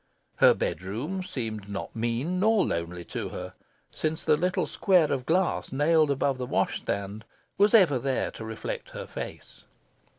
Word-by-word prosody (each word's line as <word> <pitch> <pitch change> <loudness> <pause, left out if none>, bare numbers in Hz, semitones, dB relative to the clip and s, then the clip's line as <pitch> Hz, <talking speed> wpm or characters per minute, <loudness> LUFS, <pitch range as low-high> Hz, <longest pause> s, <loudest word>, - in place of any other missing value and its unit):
Her - - +7
bedroom 120 - -3
seemed 110 - -5
not 100 +3 -5
mean 120 +10 -1
nor 215 +1 +4
lonely 85 +1 -3
to - - -4
her, 90 0 -7 0.4
since 155 +1 -2
the 155 - +5
little 180 +4 0
square 180 -6 +3
of 130 -3 -2
glass, 180 +2 +1
nailed 155 +2 +3
above 140 -1 +1
the 125 - -3
wash - - 0
stand, 100 +2 -4 0.3
was 205 +3 +5
ever 165 - +5
there 135 +1 -1
to - - -9
reflect 110 0 -5
her - - -5
face. - - -8
135 Hz, 160 wpm, -27 LUFS, 110-175 Hz, 0.4 s, Her